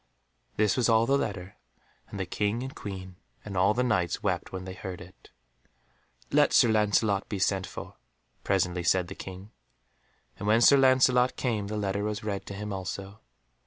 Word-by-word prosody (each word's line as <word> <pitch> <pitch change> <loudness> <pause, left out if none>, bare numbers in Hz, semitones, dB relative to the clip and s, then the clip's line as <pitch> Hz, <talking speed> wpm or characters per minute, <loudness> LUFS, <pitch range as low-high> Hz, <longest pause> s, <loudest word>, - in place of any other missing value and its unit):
This 105 -2 +2
was 125 -2 +2
all 115 0 +4
the 135 - +2
letter, 100 -7 -3 0.5
and 100 - -7
the 95 - -1
King 105 +7 -1
and 135 +1 -6
Queen 95 - -8 0.3
and 100 -2 -6
all 95 +3 +3
the 125 - +1
Knights 90 -8 0
wept - - -1
when 95 -1 -6
they 95 - -6
heard 95 -1 -7
it. 90 +1 -15 1.0
"Let - - +4
Sir 120 - +6
Lancelot 105 -2 +2
be 105 - -3
sent 95 0 0
for," - - -9 0.5
presently 90 -2 0
said 90 +1 +1
the - - -6
King, 95 +2 -9 0.9
and 100 - -4
when 110 +2 +4
Sir 140 +3 +7
Lancelot 130 -1 +4
came 110 -6 -2
the 105 +1 -4
letter 100 0 -1
was 105 +1 -3
read 100 -2 -4
to 100 - -6
him 105 0 -5
also. 95 +2 -6
100 Hz, 180 wpm, -28 LUFS, 95-110 Hz, 1.0 s, Sir